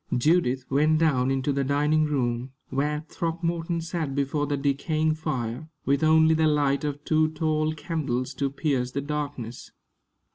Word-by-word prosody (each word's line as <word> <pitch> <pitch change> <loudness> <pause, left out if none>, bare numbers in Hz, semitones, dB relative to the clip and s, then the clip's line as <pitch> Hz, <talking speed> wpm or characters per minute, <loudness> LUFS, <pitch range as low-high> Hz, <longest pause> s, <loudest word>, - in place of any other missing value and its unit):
Judith 130 -2 +2
went 150 +3 +3
down 140 -6 +2
into 135 +1 0
the 140 0 0
dining 150 +3 +2
room, 130 -3 -1 0.2
where 150 +3 -1
Throckmorton 170 +1 -2
sat 160 -4 -3
before 145 +1 0
the 145 0 -1
decaying 155 +3 0
fire, 150 -2 -4 0.2
with 140 +2 +2
only 160 0 +5
the 160 0 +3
light 145 -2 +2
of 145 0 -4
two 155 0 +3
tall 155 -1 0
candles 140 -6 -2
to 140 +1 -1
pierce 135 -3 -1
the 140 - -1
darkness. 140 -5 -5
150 Hz, 150 wpm, -26 LUFS, 135-155 Hz, 0.2 s, only